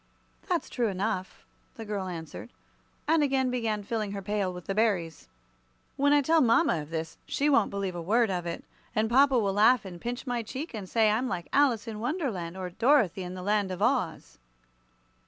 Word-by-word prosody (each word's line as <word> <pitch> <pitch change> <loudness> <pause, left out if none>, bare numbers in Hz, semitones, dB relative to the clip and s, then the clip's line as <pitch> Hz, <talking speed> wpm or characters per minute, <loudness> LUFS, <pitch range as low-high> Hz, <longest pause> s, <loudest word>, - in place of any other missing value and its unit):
"That's - - 0
true 240 -2 -1
enough," 190 -1 -3 0.3
the 225 - -8
girl 205 -3 -3
answered, 165 -3 -7 0.6
and 320 0 +4
again 265 -3 +1
began 225 -4 -1
filling 215 -1 -3
her 200 - -4
pail 205 -1 -1
with 180 -1 -9
the 195 - -2
berries. 195 -7 0 0.7
"When 285 +1 +2
I 290 -1 +4
tell 320 +3 +4
mama 240 - +3
all 150 - -5
this, 160 +1 -5
she 295 +1 +1
won't 280 - +4
believe 200 -2 -3
a 175 - -5
word 220 +5 +2
of 175 -2 -3
it. 170 - -5 0.3
And 220 +1 +1
papa 270 +1 +5
will 200 -4 +1
laugh 220 +3 +4
and 175 -3 -9
pinch 245 +2 -4
my 245 -2 -1
cheek, 265 +8 -6
and 200 -4 -6
say 220 -2 +3
I'm 235 +5 0
like 175 -9 -4
Alice 250 -6 +3
in 215 -2 -5
Wonderland, 225 - -3
or 185 -1 -5
Dorothy 225 - +3
in 180 0 -6
the 180 - -7
Land 205 0 +1
of 185 -1 -5
Oz." 165 - -1
215 Hz, 195 wpm, -28 LUFS, 185-250 Hz, 0.7 s, papa